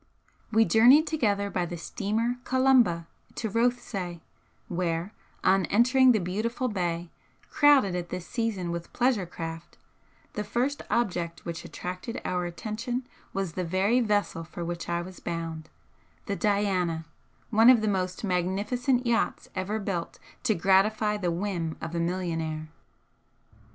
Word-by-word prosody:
We 225 Hz, 0 st, +5 dB
journeyed 250 Hz, +9 st, +6 dB
together 205 Hz, -11 st, 0 dB
by 175 Hz, -2 st, -1 dB
the 175 Hz, -, -5 dB
steamer 220 Hz, +8 st, -1 dB
'Columba' 255 Hz, -11 st, +3 dB, 0.3 s
to 220 Hz, -, -2 dB
Rothesay, 230 Hz, -7 st, -1 dB, 0.5 s
where, 175 Hz, +2 st, -2 dB, 0.3 s
on 190 Hz, -1 st, +3 dB
entering 255 Hz, +4 st, +5 dB
the 230 Hz, -, +4 dB
beautiful 220 Hz, +8 st, -2 dB
bay, 175 Hz, -4 st, -2 dB, 0.4 s
crowded 285 Hz, -10 st, +5 dB
at 175 Hz, -1 st, -3 dB
this 180 Hz, -1 st, -5 dB
season 215 Hz, -6 st, -2 dB
with 170 Hz, 0 st, -5 dB
pleasure 240 Hz, -7 st, +1 dB
craft, 165 Hz, 0 st, -7 dB, 0.6 s
the 210 Hz, -, -2 dB
first 260 Hz, +6 st, -1 dB
object 175 Hz, -7 st, -1 dB
which 170 Hz, -1 st, -5 dB
attracted 185 Hz, +7 st, -6 dB
our 180 Hz, -1 st, -1 dB
attention 230 Hz, +8 st, -4 dB, 0.3 s
was 195 Hz, -4 st, -3 dB
the 185 Hz, -, -2 dB
very 190 Hz, +8 st, +2 dB
vessel 205 Hz, -6 st, 0 dB
for 170 Hz, +1 st, -7 dB
which 170 Hz, 0 st, -4 dB
I 170 Hz, 0 st, 0 dB
was 185 Hz, +1 st, -10 dB
bound, 165 Hz, -2 st, -5 dB, 0.6 s
the 200 Hz, -, -2 dB
'Diana,' 190 Hz, -6 st, 0 dB, 0.5 s
one 225 Hz, +2 st, +7 dB
of 250 Hz, -3 st, +7 dB
the 215 Hz, -, 0 dB
most 185 Hz, -2 st, -1 dB
magnificent 210 Hz, +8 st, 0 dB
yachts 235 Hz, -1 st, 0 dB
ever 190 Hz, +3 st, -2 dB
built 195 Hz, -5 st, -3 dB, 0.3 s
to 220 Hz, -4 st, +3 dB
gratify 205 Hz, +4 st, +3 dB
the 180 Hz, -4 st, -1 dB
whim 170 Hz, -2 st, -2 dB
of 165 Hz, -, -6 dB
a 170 Hz, -, -1 dB
millionaire. 165 Hz, -3 st, -2 dB
195 Hz, 140 wpm, -27 LUFS, 175-230 Hz, 0.6 s, one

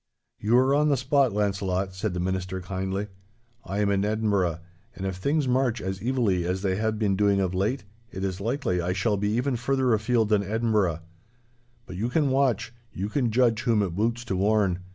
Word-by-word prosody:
'You 110 Hz, +4 st, +3 dB
are 130 Hz, +2 st, +4 dB
on 150 Hz, +1 st, +3 dB
the 140 Hz, -, +3 dB
spot, 135 Hz, 0 st, +2 dB
Launcelot,' 100 Hz, -2 st, -1 dB
said 95 Hz, 0 st, -3 dB
the -, -, -2 dB
Minister, 95 Hz, +1 st, -2 dB
kindly. 95 Hz, +2 st, -3 dB, 0.6 s
'I 100 Hz, +2 st, -3 dB
am 100 Hz, -1 st, +2 dB
in 100 Hz, 0 st, +1 dB
Edinburgh, 100 Hz, -6 st, 0 dB, 0.4 s
and 95 Hz, -, -5 dB
if 95 Hz, -1 st, -2 dB
things 140 Hz, +8 st, 0 dB
march 125 Hz, -2 st, +1 dB
as 95 Hz, +1 st, -4 dB
evilly 115 Hz, -8 st, +1 dB
as 90 Hz, +3 st, -2 dB
they 95 Hz, -2 st, +1 dB
have 110 Hz, 0 st, -1 dB
been 105 Hz, -3 st, +1 dB
doing 100 Hz, 0 st, +2 dB
of 95 Hz, -2 st, 0 dB
late, 105 Hz, +9 st, -1 dB, 0.3 s
it 95 Hz, -, -5 dB
is 95 Hz, 0 st, -3 dB
likely 110 Hz, -5 st, -1 dB
I 90 Hz, +1 st, -1 dB
shall 100 Hz, +3 st, +1 dB
be 105 Hz, +1 st, -1 dB
even 125 Hz, +3 st, 0 dB
further 130 Hz, 0 st, +1 dB
afield 110 Hz, 0 st, +1 dB
than 105 Hz, -2 st, +3 dB
Edinburgh. 105 Hz, -5 st, 0 dB, 0.8 s
But 90 Hz, -, -8 dB
you 115 Hz, +5 st, -1 dB
can 145 Hz, 0 st, +1 dB
watch—you 120 Hz, -5 st, -1 dB
can 125 Hz, 0 st, 0 dB
judge 115 Hz, -1 st, +2 dB
whom 115 Hz, -4 st, +2 dB
it 95 Hz, -, -2 dB
boots 115 Hz, +4 st, -1 dB
to 100 Hz, -, -2 dB
warn. 100 Hz, -2 st, +2 dB
105 Hz, 195 wpm, -26 LUFS, 95-120 Hz, 0.8 s, are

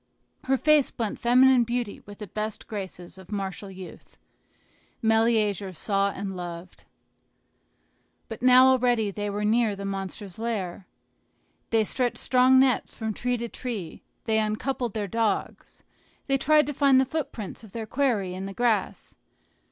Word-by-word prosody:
Her 270 Hz, +1 st, +2 dB
face 305 Hz, -1 st, +4 dB
blent 225 Hz, -3 st, -4 dB
feminine 250 Hz, +1 st, +5 dB
beauty 235 Hz, -2 st, -3 dB
with 205 Hz, 0 st, -10 dB
the 210 Hz, -, -7 dB
best 215 Hz, +2 st, -5 dB
graces 190 Hz, -3 st, -8 dB
of 190 Hz, +1 st, -14 dB
martial 195 Hz, 0 st, -4 dB
youth. 190 Hz, -1 st, -12 dB, 0.8 s
Meleager 220 Hz, -4 st, +1 dB
saw 200 Hz, +3 st, 0 dB
and 195 Hz, -1 st, -5 dB
loved. 175 Hz, 0 st, -8 dB, 1.4 s
But 225 Hz, -, -8 dB
now 255 Hz, +1 st, +7 dB
already 245 Hz, -5 st, +3 dB
they 205 Hz, +1 st, -4 dB
were 205 Hz, +1 st, -2 dB
near 220 Hz, -1 st, +2 dB
the 200 Hz, 0 st, -7 dB
monster's 195 Hz, 0 st, -6 dB
lair. 200 Hz, -5 st, -4 dB, 0.8 s
They 225 Hz, -1 st, +3 dB
stretched 245 Hz, +3 st, -1 dB
strong 255 Hz, +1 st, +4 dB
nets 260 Hz, -1 st, +2 dB
from 220 Hz, -1 st, -3 dB
tree 245 Hz, +3 st, -1 dB
to 235 Hz, 0 st, -4 dB
tree; 225 Hz, -8 st, -6 dB, 0.2 s
they 220 Hz, -1 st, +1 dB
uncoupled 225 Hz, +2 st, -2 dB
their 210 Hz, -2 st, -2 dB
dogs, 225 Hz, +2 st, -2 dB, 0.4 s
they 275 Hz, -1 st, +1 dB
tried 300 Hz, +2 st, +4 dB
to 295 Hz, -, -4 dB
find 275 Hz, -1 st, +4 dB
the 265 Hz, -, +3 dB
footprints 250 Hz, -8 st, -5 dB
of 215 Hz, -, -13 dB
their 225 Hz, +1 st, -5 dB
quarry 220 Hz, -8 st, 0 dB
in 190 Hz, +1 st, -5 dB
the 195 Hz, -, -8 dB
grass. 240 Hz, -3 st, -1 dB
220 Hz, 150 wpm, -26 LUFS, 200-250 Hz, 1.4 s, now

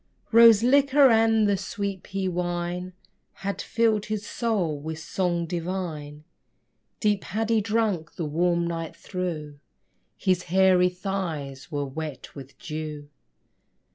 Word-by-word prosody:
Rose 230 Hz, -2 st, +8 dB
liquor 275 Hz, +1 st, +5 dB
and 225 Hz, -1 st, +4 dB
the 200 Hz, -, +3 dB
sweet 200 Hz, -1 st, -4 dB
pea 195 Hz, -1 st, -3 dB
wine 175 Hz, 0 st, -3 dB, 0.5 s
Had 200 Hz, -, -2 dB
filled 225 Hz, -3 st, +1 dB
his 215 Hz, -1 st, -3 dB
soul 195 Hz, -13 st, -1 dB
with 160 Hz, +2 st, -5 dB
song 170 Hz, +1 st, -1 dB
divine; 165 Hz, -4 st, -4 dB, 0.8 s
Deep 210 Hz, -3 st, +1 dB
had 220 Hz, +3 st, -2 dB
he 225 Hz, -1 st, +3 dB
drunk 210 Hz, -6 st, -1 dB
the 165 Hz, -, -3 dB
warm 170 Hz, +3 st, +1 dB
night 165 Hz, -1 st, -4 dB
through: 160 Hz, -6 st, -5 dB, 0.6 s
His 185 Hz, -1 st, +1 dB
hairy 185 Hz, 0 st, +4 dB
thighs 175 Hz, -8 st, -5 dB
were 145 Hz, -1 st, -1 dB
wet 150 Hz, 0 st, -7 dB
with 135 Hz, -1 st, -11 dB
dew. 150 Hz, -2 st, -6 dB
180 Hz, 125 wpm, -26 LUFS, 160-210 Hz, 0.8 s, Rose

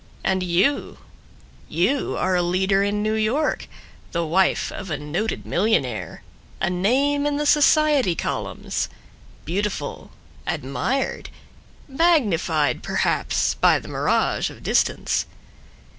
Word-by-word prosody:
And 190 Hz, -1 st, +1 dB
you, 185 Hz, +11 st, +1 dB, 0.7 s
you 190 Hz, -, 0 dB
are 185 Hz, 0 st, +1 dB
a 180 Hz, -, +3 dB
leader 190 Hz, +3 st, +2 dB
in 205 Hz, +1 st, 0 dB
New 215 Hz, 0 st, 0 dB
York, 220 Hz, +8 st, 0 dB, 0.5 s
The 170 Hz, -1 st, 0 dB
wife 185 Hz, +4 st, +1 dB
of 190 Hz, -3 st, -7 dB
a 150 Hz, -, -2 dB
noted 155 Hz, +10 st, -3 dB
millionaire, 130 Hz, -, -1 dB, 0.4 s
A 190 Hz, -, 0 dB
name 275 Hz, +10 st, +1 dB
in 290 Hz, -1 st, 0 dB
the 295 Hz, -, -1 dB
society 295 Hz, -, +4 dB
columns, -, -, -3 dB, 0.6 s
Beautiful, 185 Hz, -3 st, -3 dB, 0.4 s
admired, 250 Hz, -, -2 dB, 0.6 s
magnified 225 Hz, -, +2 dB
perhaps -, -, 0 dB
By -, -, +4 dB
the -, -, -9 dB
mirage -, -, 0 dB
of -, -, -13 dB
distance. -, -, +1 dB
195 Hz, 115 wpm, -23 LUFS, 175-270 Hz, 0.7 s, society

